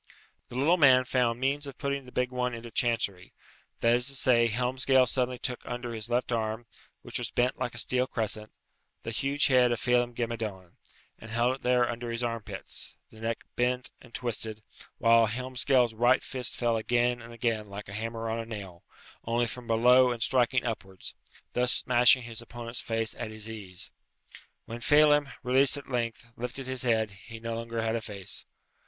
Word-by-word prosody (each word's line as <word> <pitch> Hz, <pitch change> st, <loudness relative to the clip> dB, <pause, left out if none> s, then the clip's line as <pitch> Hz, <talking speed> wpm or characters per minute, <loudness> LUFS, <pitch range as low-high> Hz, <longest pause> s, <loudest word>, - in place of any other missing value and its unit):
The -, -, -9 dB
little 150 Hz, +8 st, +3 dB
man 130 Hz, -5 st, +6 dB
found 120 Hz, -2 st, +1 dB
means 140 Hz, +2 st, 0 dB
of 140 Hz, -, -9 dB
putting 140 Hz, -2 st, -2 dB
the 125 Hz, -, -12 dB
big 125 Hz, 0 st, -1 dB
one 125 Hz, -1 st, -1 dB
into 115 Hz, 0 st, -9 dB
chancery 110 Hz, -6 st, -1 dB, 0.5 s
that 115 Hz, 0 st, +4 dB
is 125 Hz, +2 st, +2 dB
to 140 Hz, -, -2 dB
say, 120 Hz, -3 st, +4 dB
Helmsgail 130 Hz, +3 st, +3 dB
suddenly 125 Hz, 0 st, 0 dB
took 125 Hz, 0 st, -3 dB
under 120 Hz, -1 st, -5 dB
his 110 Hz, 0 st, -6 dB
left 120 Hz, +1 st, 0 dB
arm, 110 Hz, 0 st, -2 dB, 0.4 s
which -, -, -2 dB
was -, -, -3 dB
bent 125 Hz, +1 st, 0 dB
like 120 Hz, -, -3 dB
a -, -, -8 dB
steel 125 Hz, +3 st, +2 dB
crescent, 110 Hz, -2 st, -2 dB, 0.5 s
the 115 Hz, -, -4 dB
huge 140 Hz, +5 st, +1 dB
head 125 Hz, -2 st, +4 dB
of 120 Hz, -, 0 dB
Phelem 120 Hz, 0 st, +2 dB
ghe 120 Hz, -, 0 dB
Madone, 105 Hz, -6 st, -5 dB, 0.5 s
and 110 Hz, -, -11 dB
held 120 Hz, +3 st, +1 dB
it -, -, -28 dB
there 125 Hz, -1 st, +3 dB
under 120 Hz, 0 st, -4 dB
his 115 Hz, +1 st, -2 dB
armpits, 110 Hz, -4 st, -5 dB, 0.2 s
the 110 Hz, -, -15 dB
neck 115 Hz, +1 st, -3 dB
bent 125 Hz, +1 st, 0 dB
and 125 Hz, -, -16 dB
twisted, 110 Hz, -3 st, -2 dB, 0.3 s
whilst 115 Hz, -1 st, +4 dB
Helmsgail's 125 Hz, -1 st, +1 dB
right 120 Hz, +3 st, +3 dB
fist 125 Hz, -3 st, -2 dB
fell 120 Hz, -2 st, +1 dB
again 120 Hz, +2 st, +1 dB
and 115 Hz, 0 st, -11 dB
again 115 Hz, -3 st, -2 dB
like 100 Hz, +1 st, -8 dB
a 100 Hz, -, -9 dB
hammer 115 Hz, +1 st, -4 dB
on 115 Hz, +1 st, -2 dB
a 115 Hz, -, -4 dB
nail, 100 Hz, -6 st, -8 dB, 0.4 s
only 120 Hz, +1 st, +1 dB
from 120 Hz, +1 st, -7 dB
below 125 Hz, +3 st, +5 dB
and 120 Hz, -2 st, -1 dB
striking 125 Hz, +2 st, +2 dB
upwards, 95 Hz, -5 st, -5 dB, 0.4 s
thus 125 Hz, 0 st, +2 dB
smashing 125 Hz, +1 st, +4 dB
his 115 Hz, -1 st, -6 dB
opponent's 120 Hz, 0 st, -6 dB
face 115 Hz, -1 st, -1 dB
at 115 Hz, -, -3 dB
his 110 Hz, 0 st, -4 dB
ease. 100 Hz, -4 st, -6 dB, 0.7 s
When 115 Hz, +1 st, -7 dB
Phelem, 145 Hz, +2 st, +4 dB
released 130 Hz, +3 st, +5 dB
at 140 Hz, -1 st, -9 dB
length, 120 Hz, -1 st, -3 dB
lifted 125 Hz, +3 st, -5 dB
his 130 Hz, -1 st, -3 dB
head, 110 Hz, -4 st, +1 dB
he 100 Hz, +4 st, -12 dB
had 115 Hz, -, -10 dB
no 115 Hz, 0 st, -3 dB
longer 115 Hz, 0 st, -5 dB
a 115 Hz, 0 st, 0 dB
face. 100 Hz, -4 st, -4 dB
120 Hz, 190 wpm, -29 LUFS, 115-125 Hz, 0.7 s, man